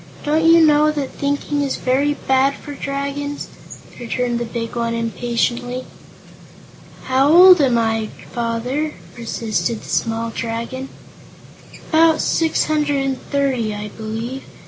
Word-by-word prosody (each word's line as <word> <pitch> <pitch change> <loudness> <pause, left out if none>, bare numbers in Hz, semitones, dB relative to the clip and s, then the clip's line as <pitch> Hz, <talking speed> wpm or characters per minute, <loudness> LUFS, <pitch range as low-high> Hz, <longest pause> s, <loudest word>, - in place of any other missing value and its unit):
Don't 310 +2 +1
you 330 0 +7
know 300 0 +4
that 290 -3 -3
thinking 285 +1 -2
is 280 -1 -1
very 280 +3 +1
bad 265 +1 +1
for 290 - -9
Dragons?" 280 +1 -4 0.5
returned 240 0 -2
the 240 - -2
big 230 0 -5
one, 230 -1 -1
impatiently. 240 +2 -2 1.2
"How 265 +2 +2
old 360 0 +8
am 255 -4 +3
I, 225 -1 0 0.3
Father?" 245 +6 -2 0.2
persisted 230 -1 -2
the - - -11
small 230 0 -1
Dragon. 230 +4 -4 1.0
"About 320 0 +4
six 325 -1 +1
hundred 290 -3 0
and 265 -1 -2
thirty, 260 -7 0
I 210 0 -6
believe. 225 +5 -5
260 Hz, 125 wpm, -19 LUFS, 230-290 Hz, 1.2 s, old